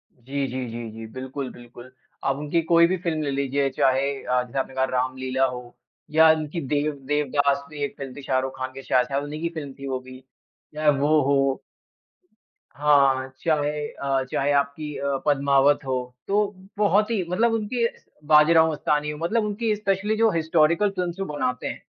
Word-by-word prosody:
जी, 135 +3 -3
जी, 130 0 -4
जी, 115 0 -6
जी। 110 +1 -8
बिल्कुल, 130 +1 -5
बिल्कुल। 120 +1 -13 0.3
आप 135 - +2
उनकी 150 +3 0
कोई 170 0 +7
भी 185 +2 0
फ़िल्म 165 -3 -2
ले 140 - -1
लीजिये 140 0 0
चाहे 135 +1 +3
अ, 125 0 +1
जैसे 125 +2 -4
आपने 135 - -3
कहा 130 0 +2
रामलीला 130 +1 0
हो 125 -1 -6 0.4
या 160 +1 +6
उनकी 155 +1 -2
देव 150 +2 +1 0.2
देवदास 145 -1 +1
भी 150 -2 -5
एक 140 - -3
फिल्म 135 -2 -7
थी 145 - -8
शाहरुख 130 -1 -1
खान 130 0 -4
के 135 - -8
शाह 125 - +3
शायद 140 +2 -2
उन्हीं 150 +2 -6
की 170 - -1
फिल्म 140 -3 -8
थी 140 - -6
वो 130 -1 -2
भी। 130 0 -12 0.6
चाहे 155 0 +2
वो 150 +2 +3
हो 135 -1 +2 1.1
हाँ, 140 -3 +3
चाहे 150 -2 0
अ, 135 -1 -1
चाहे 140 +1 +1
आपकी 140 +1 -1
अ, 140 -1 -1
पद्मावत 140 0 +3
हो। 130 -1 0 0.3
तो 205 +1 +2 0.3
बहुत 210 +1 +3
ही 210 -5 0
मतलब 225 +6 +2
उनकी 225 +2 0 0.4
बाजीराव 160 +2 +6
मस्तानी 150 0 -1
मतलब 170 +9 0
उनकी 210 +1 -1
स्पेशली 205 +1 0
जो 225 0 +4
हिस्टोरिकल 165 +3 +2
फ़िल्म्स 180 -3 -3
भी - - 0
बनाते 125 -4 -2
हैं - - -6
145 Hz, 180 wpm, -24 LUFS, 135-160 Hz, 1.1 s, कोई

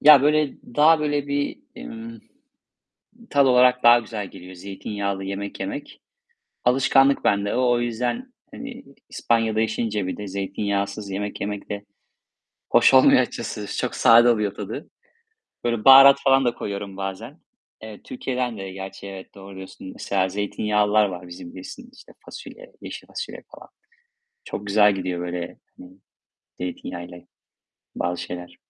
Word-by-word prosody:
Ya 145 -2 +8
böyle 150 -1 +2 0.2
daha 155 +2 +6
böyle 145 -1 -1
bir, 145 0 -2 0.2
ımm, 115 0 -9 1.1
tat 140 -1 +4
olarak 125 0 +4
daha 120 0 +8
güzel 110 -3 -6
geliyor 90 0 -12
zeytinyağlı 100 +1 -4
yemek 100 +1 -5
yemek. 100 +10 -6 0.6
Alışkanlık 135 +2 +3
bende 100 0 +1
o, 125 -1 +2
o 120 - +2
yüzden, 125 - -3 0.2
hani, 260 0 -9 0.3
İspanya'da 115 -2 0
yaşayınca 110 -3 -1
bir - - -4
de 105 - -6
zeytinyağsız 100 +1 -3
yemek 100 +1 -4
yemek 100 0 -5
de 100 0 -5 0.9
hoş - - +5
olmuyor 130 -1 +7
açıkçası. 115 -4 -5
Çok - - -2
sade 120 +1 +6
oluyor 105 -4 +1
tadı. 105 +9 -7 0.7
Böyle 120 -2 -1
baharat 135 +1 +10
falan 135 -1 +4
da 120 - +2
koyuyorum 100 -3 -6
bazen. 100 - -6 0.4
Eee, 110 -1 -10
Türkiye'den 125 -2 -3
de 95 -1 -6
gerçi 95 +1 -8
evet, 95 0 -10
doğru 100 0 -11
diyorsun. 95 0 -10
Mesela 95 -1 -1
zeytinyağlılar 105 +1 +1
var 90 -2 -6
bizim 85 0 -10
bilirsin 235 - -10
işte, - - -17
fasulye, - - -11
yeşil - - -8
fasulye - - -7
falan. - - -14 0.8
Çok 105 - -6
güzel 105 0 +4
gidiyor, 90 -2 -3
böyle, 90 0 -5 0.2
hani, 90 - -13 0.7
zeytinyağıyla 90 0 -6 0.8
bazı 90 0 -2
şeyler. 90 0 -8
105 Hz, 140 wpm, -23 LUFS, 95-125 Hz, 1.1 s, baharat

